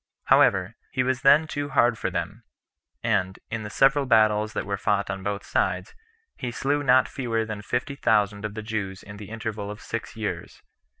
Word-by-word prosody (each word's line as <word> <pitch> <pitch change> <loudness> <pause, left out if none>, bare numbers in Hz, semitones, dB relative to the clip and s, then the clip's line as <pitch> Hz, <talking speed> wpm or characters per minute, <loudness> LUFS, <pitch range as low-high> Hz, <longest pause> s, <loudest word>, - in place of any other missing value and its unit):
However, 95 +2 +4 0.2
he 130 - 0
was 130 0 0
then 140 +4 +6
too 145 -2 -4
hard 120 -4 +3
for 110 - -2
them; 90 +5 -4 0.6
and, 95 -4 0
in 115 0 -2
the 105 - -6
several 135 +4 +3
battles 110 -2 +3
that - - -3
were 100 - -1
fought 100 0 0
on 95 0 -5
both 100 +1 -3
sides, - - -1 0.4
he 125 - -3
slew 140 +4 0
not 130 -2 +4
fewer 115 -4 -2
than 110 -1 -5
fifty 125 +6 -2
thousand 105 -5 +1
of 105 -1 -4
the 110 - -5
Jews 105 -4 -4
in 100 0 -10
the 105 -1 -9
interval 110 -2 -5
of 105 0 -7
six 115 +1 -6
years. 110 -2 -5
110 Hz, 190 wpm, -25 LUFS, 100-125 Hz, 0.6 s, then